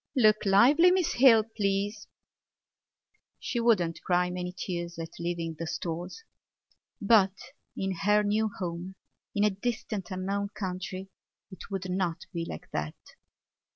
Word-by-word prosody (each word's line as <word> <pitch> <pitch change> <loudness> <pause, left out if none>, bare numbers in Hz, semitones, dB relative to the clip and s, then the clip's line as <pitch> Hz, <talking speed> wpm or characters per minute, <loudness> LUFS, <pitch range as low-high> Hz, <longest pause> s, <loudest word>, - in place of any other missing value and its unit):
"Look 215 -5 +4
lively, 270 - +6
Miss 360 -2 +2
Hill, 240 -4 +6
please." 205 +1 -1 1.3
She 240 - -2
would 230 -2 +5
not 165 -2 -3
cry 180 0 +1
many 180 0 -4
tears 175 -2 -5
at 165 -1 -6
leaving 170 -1 -3
the 165 - -3
Stores. 175 - -5 0.8
But 200 -2 +4 0.4
in 195 0 -1
her 210 +3 +2
new 215 +1 +1
home, 180 +1 -5 0.4
in 205 - +2
a 210 - +4
distant 215 -1 -4
unknown 200 +2 -2
country, 190 -1 -5 0.4
it 190 - -11
would 195 -2 -4
not 180 -2 -2
be 170 -1 -2
like - - -8
that. 75 +1 -3
195 Hz, 135 wpm, -29 LUFS, 180-210 Hz, 1.3 s, lively